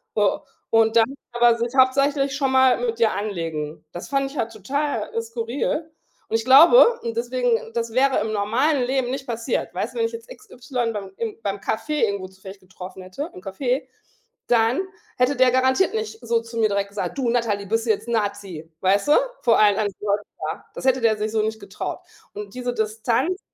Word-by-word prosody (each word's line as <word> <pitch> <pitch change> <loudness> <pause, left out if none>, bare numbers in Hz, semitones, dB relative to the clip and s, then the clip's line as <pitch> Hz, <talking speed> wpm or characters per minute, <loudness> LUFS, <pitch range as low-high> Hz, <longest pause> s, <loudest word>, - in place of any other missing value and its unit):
So, 205 -2 +2 0.3
und 225 0 +3
dann 225 -1 +6 0.3
aber 240 -1 +4
sich 235 +1 -3
hauptsächlich 275 +1 +3
schon 275 -2 0
mal 260 -1 +4
mit 230 -2 -1
dir 225 -2 +4
anlegen. 165 -7 -4
Das 175 - -8
fand 275 -1 0
ich 290 - -10
halt 230 -2 -1
total 230 +2 -3
skurril. 235 +7 -3 0.4
Und - - -1
ich 225 - 0
glaube 345 - +7
und 465 -1 -3
deswegen, 475 0 0
das 230 -1 -3
wäre 265 +2 +3
im 220 - -2
normalen 245 +8 +1
Leben 260 -1 0
nicht 270 0 -5
passiert, 230 -1 -2
weißt - - -3
du, - - -5
wenn 455 - +2
ich - - -10
jetzt 460 +2 -9
x 425 -4 -14
y 245 -2 -3
beim 200 -2 -6
im 225 -2 -4
beim 200 0 -3
Kaffee 295 +9 -1
irgendwo 200 -3 -3
zufällig 190 +1 -12
getroffen 185 0 -10
hätte, 185 - -6
im 180 - -10
Café, 245 +8 -2 0.6
dann 235 +5 +3 0.4
hätte 250 +3 +2
der 255 -1 +4
garantiert 260 - +2
nicht 440 0 -4
so 230 0 +1
zu 230 0 -9
mir 220 -1 +3
direkt 200 0 -1
gesagt: 200 +6 -4
„Du 250 -3 +1
Natalie, 220 -4 0
bist 225 +3 0
du - - -4
jetzt 215 +2 -3
'n 235 - -2
Nazi?“ 200 -7 -3
Weißt 195 +4 +2
du? - - +7 0.3
Vor 230 -2 +4
allen 210 -1 +5
anderen 205 -2 -1
Leute 205 0 0 0.3
da. - - -10
Das - - -7
hätte 260 -1 +3
der 225 -2 +3
sich 210 +1 -2
so 220 -1 +1
nicht 220 0 -3
getraut. - - -6 0.3
Und 205 -1 -8
diese 250 -1 -3
Distanz, 230 - -1
230 Hz, 205 wpm, -23 LUFS, 210-270 Hz, 0.6 s, glaube